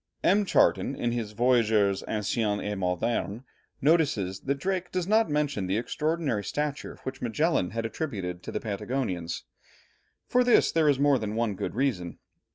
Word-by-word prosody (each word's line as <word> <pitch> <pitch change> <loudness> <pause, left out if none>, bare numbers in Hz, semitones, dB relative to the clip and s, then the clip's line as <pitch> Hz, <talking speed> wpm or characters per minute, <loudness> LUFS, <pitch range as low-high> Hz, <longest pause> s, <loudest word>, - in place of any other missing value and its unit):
M. 200 +2 +4
Charton, 140 - +3
in 120 - -1
his 115 -3 -3
Voyageurs 110 -4 +3
Anciens 105 0 0
et 105 - -1
Modernes, 95 +3 -1 0.4
notices 140 - +2
that 140 +1 -2
Drake 185 +2 -2
does 185 -2 -1
not 220 -2 +3
mention 145 -10 0
the 95 +3 0
extraordinary 150 -1 -1
stature 145 +5 -3
which 130 0 -6
Magellan 125 - +1
had 115 +3 -3
attributed 100 - -4
to - - -7
the - - -2
Patagonians. 100 -5 -3 0.8
For 250 0 +3
this 245 -1 +4
there 160 -2 +3
is 140 - +3
more 140 -1 +3
than 105 0 -3
one 115 -2 0
good 100 - -4
reason. 115 -10 -1
120 Hz, 160 wpm, -27 LUFS, 100-150 Hz, 0.8 s, M